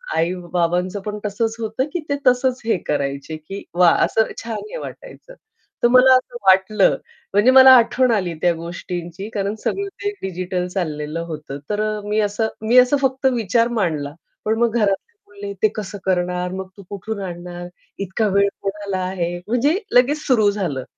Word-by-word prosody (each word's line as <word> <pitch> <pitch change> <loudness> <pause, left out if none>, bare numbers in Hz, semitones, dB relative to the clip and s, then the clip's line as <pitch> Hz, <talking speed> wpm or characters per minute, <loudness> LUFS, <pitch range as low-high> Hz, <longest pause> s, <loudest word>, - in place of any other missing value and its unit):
आई-बाबांचं 175 +2 -1
पण 210 +1 -5
तसंच 220 +2 -1
होतं, 225 +4 -2
की 355 - -1
ते 285 - +1
तसंच 255 +1 +2
हे 225 -5 +2
करायचे, 140 +1 -2
की 195 +6 -8
वाह! 175 -1 +5
असं 220 - +1
छान 230 -1 -4
हे - - -5
वाटायचं. - - -10 0.5
तर - - +7
मला 255 +1 +7
असं 255 -1 -1
वाटलं, 190 +2 +4 0.4
म्हणजे 205 +6 +5
मला 260 0 +9
आठवण 250 +1 +3
आली 185 -6 0
त्या 175 -1 +3
गोष्टींची. 175 +3 -6
कारण 200 0 -2
सगळं 400 0 -1 0.2
ते 410 - 0
डिजिटल 180 -1 -3
चाललेलं 155 -4 -3
होतं. 150 -3 -7
तर 210 0 -1
अ, 215 0 -2
मी 210 +1 +1
असं 210 +2 0
मी 230 +3 +3
असं 250 +3 +4
फक्त 265 0 -1
विचार 230 0 +2
मांडला 150 -6 -1 0.3
पण 220 +1 +1
मग 235 -2 +2
घरातले 210 - +1 0.2
बोलले, 200 0 -8
"ते - - +7
कसं 205 -1 -5
करणार? 180 -1 0
मग 190 0 -5
तू 200 - -11
कुठून 205 +2 -5
आणणार? 175 -1 -7 0.3
इतका 200 +3 -1
वेळ 200 0 +4
कोणाला 200 -1 -3
आहे?" 175 -2 -2
म्हणजे 260 - +2 0.2
लगेच 265 +5 +4
सुरु 220 -6 +4
झालं. 170 -10 -3
200 Hz, 170 wpm, -20 LUFS, 180-230 Hz, 0.5 s, मला